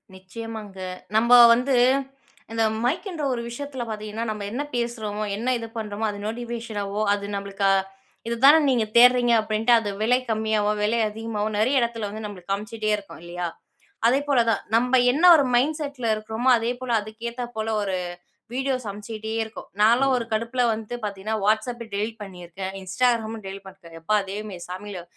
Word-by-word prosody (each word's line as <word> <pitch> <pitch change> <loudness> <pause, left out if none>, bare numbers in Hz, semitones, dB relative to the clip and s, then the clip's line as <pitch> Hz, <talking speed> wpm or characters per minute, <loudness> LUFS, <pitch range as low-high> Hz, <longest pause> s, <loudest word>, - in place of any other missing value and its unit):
நிச்சயமாங்க. 205 +1 -8 0.4
நம்ம 235 +2 +2 0.2
வந்து 255 +3 +1 0.8
இந்த 225 0 +1 0.2
மைக்ன்ற 320 - -2
ஒரு 240 - -3
விஷயத்துல 265 +1 -5
பார்த்தீங்கன்னா, 215 +1 -4
நம்ம 210 -1 -4
என்ன 250 - -2
பேசுறோமோ! 220 -3 -2
என்ன 240 +4 -2
இது 230 -1 -6
பண்றோமோ! 215 0 -3
அது 205 - -8
நோட்டிஃபிகேஷனாவோ 225 -3 -4
அது 200 - -6
நம்மளுக்கு 200 0 -1 0.6
இது 235 - -1
தானே 295 +3 +9
நீங்க 240 -4 +2
தேடுறீங்க 245 0 +6
அப்பிடின்ட்டு 220 +2 +1
அது 215 -2 -4
விலை 240 +3 +4
கம்மியாவும், 215 -1 0
விலை 225 +3 +1
அதிகமாவும் 215 -1 -3
நிறைய 255 +6 +2
இடத்துல 235 -3 -1
வந்து 215 +1 -7
நம்மளுக்கு 195 -2 -8
காமிச்சிட்டே 215 +2 -2
இருக்கும் 200 -5 -10
இல்லயா! 175 0 -4 0.6
அதேபோல 275 +2 +2
தான் - - +1
நம்ம 250 +2 +4
என்ன 300 +6 -1
ஒரு 285 - +4
மைண்ட் 295 +6 +2
செட்ல 280 -5 -5
இருக்கிறோமோ! 220 +4 -1
அதே 230 +1 -1
போல 255 -1 -4
அதுக்கு 220 +3 -7
ஏத்த 245 +1 -5
போல 220 0 -2 0.2
ஒரு 190 -2 -1 0.6
வீடியோ 265 +1 0
சமைச்சுக்கிட்டே 215 +2 -6
இருக்கோம். 220 0 -10
நான்லாம் 250 +5 +5
ஒரு 235 - -3
கடுப்புல 230 +3 0
வந்து 220 +2 -5
பார்த்தீங்கன்னா, 205 +1 -3
WhatsApp 220 +3 +1
டெலீட் 215 +2 -3
பண்ணியிருக்கேன். 190 0 -7
Instagramம் 225 +2 0
டெலீட் 195 +1 -7
பண்ணிருக்கேன். 185 -3 -14
எப்பா! 210 +6 +2
தெய்வமே 205 -1 -6
சாமிகளா! 185 0 -7
220 Hz, 155 wpm, -24 LUFS, 205-240 Hz, 0.8 s, தானே